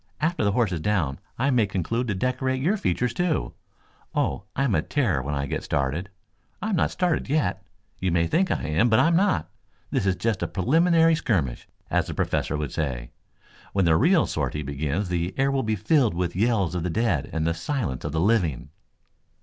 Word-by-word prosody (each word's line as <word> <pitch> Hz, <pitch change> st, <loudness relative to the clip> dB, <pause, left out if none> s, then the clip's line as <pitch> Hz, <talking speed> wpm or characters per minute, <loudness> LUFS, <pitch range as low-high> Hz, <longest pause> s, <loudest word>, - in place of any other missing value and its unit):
After 165 Hz, -4 st, 0 dB
the 100 Hz, -1 st, +2 dB
horse 115 Hz, -3 st, +2 dB
is 85 Hz, -, -2 dB
down 80 Hz, -7 st, 0 dB, 0.2 s
I 135 Hz, +4 st, +1 dB
may 115 Hz, -5 st, +3 dB
conclude 105 Hz, +7 st, -2 dB
to 105 Hz, -, -1 dB
decorate 130 Hz, +4 st, -1 dB
your 170 Hz, +11 st, +2 dB
features, 120 Hz, -, 0 dB
too. 170 Hz, +2 st, -1 dB, 0.6 s
Oh, 70 Hz, +8 st, 0 dB
I'm 135 Hz, -4 st, +1 dB
a 80 Hz, -, +3 dB
terror 100 Hz, -, 0 dB
when 70 Hz, +3 st, -3 dB
I 70 Hz, 0 st, -1 dB
get -, -, -3 dB
started. 70 Hz, +7 st, -1 dB, 0.5 s
I'm 215 Hz, -2 st, -1 dB
not 160 Hz, -, +2 dB
started 175 Hz, -6 st, -1 dB
yet. 150 Hz, +1 st, 0 dB, 0.4 s
You 95 Hz, -1 st, 0 dB
may 85 Hz, 0 st, +2 dB
think 185 Hz, -, +1 dB
I -, -, -1 dB
am, 80 Hz, +10 st, +2 dB
but 110 Hz, -, +4 dB
I'm 165 Hz, +6 st, +4 dB
not. 170 Hz, -, +1 dB, 0.4 s
This 95 Hz, -, 0 dB
is 95 Hz, -, +2 dB
just 110 Hz, -2 st, -1 dB
a -, -, 0 dB
preliminary 165 Hz, -, +3 dB
skirmish, 90 Hz, -, -1 dB, 0.2 s
as -, -, +1 dB
the -, -, -5 dB
Professor 75 Hz, -, -1 dB
would 75 Hz, -3 st, -3 dB
say. 65 Hz, -6 st, -3 dB, 0.6 s
When 95 Hz, -2 st, +2 dB
the 80 Hz, -1 st, +4 dB
real 170 Hz, -, +4 dB
sortie 75 Hz, 0 st, -2 dB
begins 70 Hz, +7 st, -2 dB
the 90 Hz, +1 st, -2 dB
air 135 Hz, +1 st, +2 dB
will 135 Hz, -1 st, +1 dB
be 110 Hz, -3 st, 0 dB
filled 110 Hz, -, +2 dB
with 90 Hz, -1 st, -1 dB
the 90 Hz, -, -4 dB
yells 105 Hz, -6 st, +2 dB
of 90 Hz, -, -2 dB
the 90 Hz, -, -2 dB
dead 90 Hz, -, 0 dB
and 80 Hz, -1 st, -1 dB
the 85 Hz, -, +1 dB
silence 85 Hz, -, -3 dB
of 75 Hz, -, -3 dB
the 80 Hz, -, -1 dB
living." 85 Hz, -, +1 dB
100 Hz, 205 wpm, -25 LUFS, 80-130 Hz, 0.6 s, but